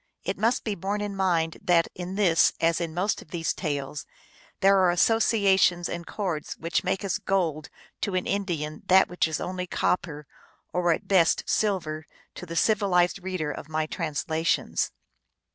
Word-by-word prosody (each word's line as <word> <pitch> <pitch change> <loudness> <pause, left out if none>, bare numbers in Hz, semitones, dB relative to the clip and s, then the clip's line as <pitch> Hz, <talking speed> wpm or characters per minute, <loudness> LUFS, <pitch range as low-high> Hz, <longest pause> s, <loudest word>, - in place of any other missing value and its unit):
It 190 - -2
must 230 +4 +1
be 215 - -2
borne 200 +2 -3
in 205 -1 -4
mind 170 -4 0
that 170 -2 +3
in 180 +1 -6
this, 185 -5 +4
as 165 +1 +2
in 165 -1 -2
most 190 +4 0
of - - -16
these 165 -1 -2
tales, 145 -3 -4 0.5
there 195 0 +5
are 185 -1 +4
associations 190 -2 +3
and 170 -1 -6
chords 175 -8 -4
which 165 +1 -1
make 190 +1 -1
as 195 -2 -1
gold 165 -6 -1 0.3
to 200 - -1
an 180 - 0
Indian 170 -7 -2
that 190 +1 +6
which 180 -2 0
is 160 -2 -3
only 180 0 -4
copper, 150 -5 -1 0.5
or 175 -1 +2
at 165 - -2
best 180 -4 +3
silver, 160 -7 -1 0.3
to 180 - -9
the 165 - -6
civilized 190 -2 +2
reader 180 -5 -3
of 150 - -8
my 155 0 -1
translations. 160 0 -1
180 Hz, 165 wpm, -26 LUFS, 165-195 Hz, 0.5 s, that